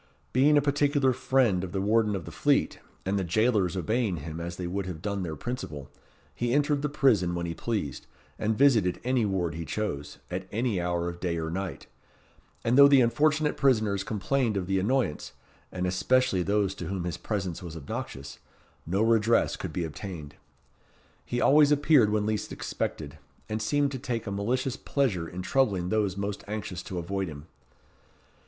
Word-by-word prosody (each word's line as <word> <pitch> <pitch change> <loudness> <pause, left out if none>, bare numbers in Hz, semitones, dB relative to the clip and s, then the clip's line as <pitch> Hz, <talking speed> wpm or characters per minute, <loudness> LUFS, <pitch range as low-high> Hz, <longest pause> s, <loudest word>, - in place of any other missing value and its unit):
Being 145 +4 +5
a 145 - +3
particular 145 -2 +2
friend 120 -7 +2
of 90 - -6
the 95 - -1
Warden 105 +1 +2
of 90 -5 -5
the - - -8
Fleet, - - +1 0.3
and 100 +1 0
the - - -1
jailers 100 -1 +1
obeying 110 +1 0
him 80 +2 -6
as 85 +1 -5
they 90 - -5
would 95 +2 -3
have 90 -4 -5
done 100 +2 -3
their 80 -4 -4
principal, 75 - -6 0.4
he 120 0 -1
entered 145 0 +2
the 150 - -1
prison 115 -12 +2
when 85 0 -2
he 85 - -3
pleased, 100 - -3 0.3
and 110 0 0
visited 115 -10 +4
any 125 -2 +1
ward 90 -5 -1
he 85 +1 -5
chose, 80 -3 -4
at 95 +1 -4
any 110 -4 0
hour 85 0 -1
of 85 0 -5
day 85 -2 -1
or 80 0 -3
night; 95 +1 -4 0.8
and 120 +4 +3
though 140 - +10
the 140 -1 +6
unfortunate 150 +5 +2
prisoners 110 -8 +2
complained 110 +3 0
of 95 - -2
the 95 +1 +1
annoyance, 115 - -1 0.4
and 90 0 -2
especially 95 +3 +2
those 100 +1 +1
to 100 - -6
whom 95 -2 -3
his 85 -1 -3
presence 95 -4 -3
was 85 -2 -7
obnoxious, 70 -1 -6 0.5
no 95 +5 +1
redress 115 0 +3
could 95 - -5
be 85 +2 -2
obtained. 80 -2 -7 0.9
He 120 - -3
always 150 +2 +5
appeared 145 -6 +5
when 105 0 +1
least 110 -1 -2
expected, 75 0 -4 0.3
and 110 +1 -3
seemed 140 +6 +1
to 130 - -4
take 120 -3 -3
a 100 - -4
malicious 125 +6 -1
pleasure 105 - 0
in 90 +1 -6
troubling 100 -8 +1
those 105 -3 0
most 100 0 -3
anxious 100 -4 -4
to 90 - -6
avoid 95 +3 -2
him. 75 -2 -9
100 Hz, 180 wpm, -28 LUFS, 90-125 Hz, 0.9 s, though